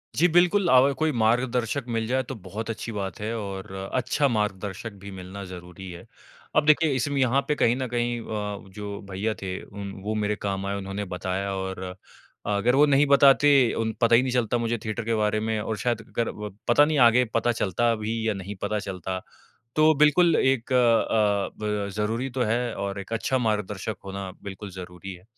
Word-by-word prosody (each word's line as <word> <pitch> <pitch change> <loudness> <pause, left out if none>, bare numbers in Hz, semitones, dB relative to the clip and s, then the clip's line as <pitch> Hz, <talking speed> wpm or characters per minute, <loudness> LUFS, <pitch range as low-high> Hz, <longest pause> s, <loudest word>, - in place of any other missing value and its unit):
जी, 175 - +4
बिल्कुल, 175 +3 +3
अव 130 +2 +6
कोई 155 +2 0
मार्गदर्शक 120 +3 +1
मिल 115 0 0
जाए 130 +2 +1
तो 130 +1 -7
बहुत 110 +2 -7
अच्छी 115 +1 -4
बात 100 0 -4
है 110 +2 -3
और 100 -1 -6 0.2
अच्छा 130 +3 +1
मार्गदर्शक 105 -2 -2
भी 100 - -8
मिलना 95 +1 -8
ज़रूरी 90 +1 -9
है। 85 - -10 0.5
अब 155 - +4
देखिए 155 0 +4
इसमें 140 +2 -1
यहाँ 130 +2 +3
पे 150 - +1
कहीं 120 -4 +3
न 130 0 -3
कहीं 120 0 0
अ, 105 -3 -5
जो 100 -1 -6
भैया 100 +4 -1
थे 95 -1 -4
उम, 100 -1 -7
वो 110 +2 -2
मेरे 105 0 0
काम 100 -1 -3
आए 100 0 -2
उन्होंने 100 +1 -4
बताया 95 +2 -2
और 95 -1 -4
अ, 90 0 -5 0.6
अगर 120 +5 +2
वो 145 +2 +6
नहीं 140 0 +4
बताते 140 +1 +6 0.3
उन 110 -1 -1
पता 115 0 +5
ही 120 - +6
नहीं 130 - -1
चलता 120 -1 +1
मुझे 115 0 -1
थिएटर 110 +2 -3
के 115 0 +1
बारे 105 0 +1
में 110 0 -1
और 110 +1 -3
शायद 115 +2 -1
अगर 115 -2 -2
व 105 -2 -7
पता 145 +5 +6
नहीं 155 -1 0
आगे 125 +2 +3
पता 115 +1 +2
चलता 115 +5 +2
भी 110 +1 -2
या 110 - +2
नहीं 100 +1 -6
पता 105 - -1
चलता। 95 -2 -4 0.6
तो 155 +1 +6
बिल्कुल 155 +3 +5
एक 130 -1 +1
अ, 110 -4 +3
ब 105 -1 -2
ज़रूरी 115 +5 -1
तो 125 0 -1
है 120 0 -1
और 100 0 -4
एक 100 +3 -9
अच्छा 130 +3 0
मार्गदर्शक 105 -3 -2
होना 95 -1 -5
बिल्कुल 100 +1 -7
ज़रूरी 90 +1 -8
है। 90 +1 -15
110 Hz, 200 wpm, -25 LUFS, 100-125 Hz, 0.6 s, अव